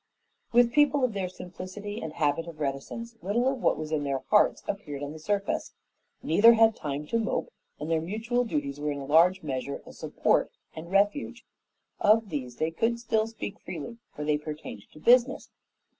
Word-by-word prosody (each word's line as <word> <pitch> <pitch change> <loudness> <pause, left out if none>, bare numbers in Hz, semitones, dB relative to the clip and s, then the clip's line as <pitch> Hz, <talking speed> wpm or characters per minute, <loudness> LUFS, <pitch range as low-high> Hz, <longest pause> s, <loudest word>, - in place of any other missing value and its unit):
With 240 0 +4
people 290 -2 +4
of 250 -3 +1
their 190 -2 -2
simplicity 185 +4 -7
and 160 -1 -5
habit 155 +2 0
of 165 -2 -10
reticence, 150 +12 -4
little 225 +7 +1
of 265 -2 -1
what - - +2
was 155 0 -5
in 155 -2 0
their 140 -2 -2
hearts 210 - +4
appeared 145 -8 -4
on 145 +1 -5
the 160 - -9
surface. 200 +4 -2 0.5
Neither 205 +9 +7
had 225 -1 +5
time 145 0 -4
to 230 +9 0
mope, 220 - -2 0.3
and 150 - -4
their 165 -1 +1
mutual 225 +8 -1
duties 145 - -3
were 150 0 -2
in 145 - -4
a 140 - -6
large 170 +6 +4
measure 140 -1 -4
a - - -12
support - - +1 0.3
and 160 +2 -8
refuge. 205 +8 +1 0.5
Of 215 0 +4
these 130 -6 -4
they 160 +4 -1
could 230 +7 0
still 220 -2 +1
speak 220 -2 -7
freely 180 +7 -7 0.2
for 150 - -5
they 150 0 +1
pertained 150 0 -8
to - - -15
business. 250 - +3
180 Hz, 190 wpm, -28 LUFS, 150-225 Hz, 0.5 s, Neither